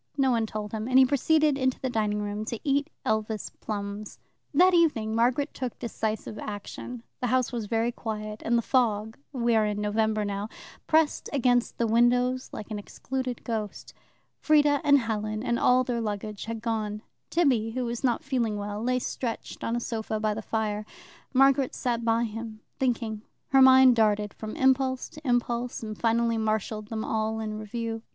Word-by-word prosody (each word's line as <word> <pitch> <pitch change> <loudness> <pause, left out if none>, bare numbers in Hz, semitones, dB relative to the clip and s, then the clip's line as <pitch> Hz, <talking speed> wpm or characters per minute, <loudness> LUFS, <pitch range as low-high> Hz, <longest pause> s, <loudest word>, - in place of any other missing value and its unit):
No 265 -2 +3
one 230 -2 +1
told 210 -1 -5
him, 220 0 -3
and 255 0 +3
he 265 - +8
proceeded 295 +2 +2
into 260 -1 +1
the 260 - -2
dining 210 -3 0
room, 205 +1 -3
to 235 0 -4
eat 285 +1 +1 0.2
Elvas 220 -1 -1
plums. 205 0 -5 0.3
That 360 +5 +5
evening 290 -11 +3
Margaret 250 +6 +1
took 255 -3 -4
decisive 220 -2 -3
action. 215 +3 -7 0.2
The 250 - -1
house 255 +1 +1
was 230 -4 -3
very 230 +2 +1
quiet, 215 -2 -5
and 235 +1 +2
the 235 - 0
fog 220 -4 +1 0.2
we 240 -4 +1
are 220 - +4
in 210 0 -2
November 215 0 0
now 205 +1 -3 0.4
pressed 315 -1 +2
against 245 -3 +2
the 235 - +1
windows 245 +3 +2
like 215 - -8
an 210 - -3
excluded 255 +4 -5
ghost. 220 -3 -4 0.5
Frieda 295 -2 +4
and 285 -1 +6
Helen 215 -3 -2
and 240 -2 0
all 250 +1 +4
their 240 -2 -2
luggage 210 -1 -4
had 225 0 -5
gone. 215 -2 -2 0.3
Tibby, 260 -10 +2
who 255 0 -1
was 235 +1 -4
not 245 -3 +1
feeling 235 -6 -1
well, 205 +1 -4
lay 250 +2 +1
stretched 240 -1 -4
on 230 - -1
a - - 0
sofa 220 -2 -3
by 215 0 0
the 220 - -5
fire. 215 -1 -2 0.5
Margaret 270 0 +4
sat 235 -2 -1
by 230 0 +2
him, 225 -1 -6 0.2
thinking. 230 -4 -1 0.3
Her 270 -1 +5
mind 260 -1 +8
darted 210 -2 +2
from 215 -1 -7
impulse 265 -1 +2
to 305 -3 -11
impulse, 240 -1 0
and 215 -1 -5
finally 230 +1 +1
marshalled 215 -1 -1
them 220 0 -4
all 220 0 -1
in 215 -1 -4
review. 225 +1 -4
230 Hz, 180 wpm, -27 LUFS, 215-255 Hz, 0.5 s, he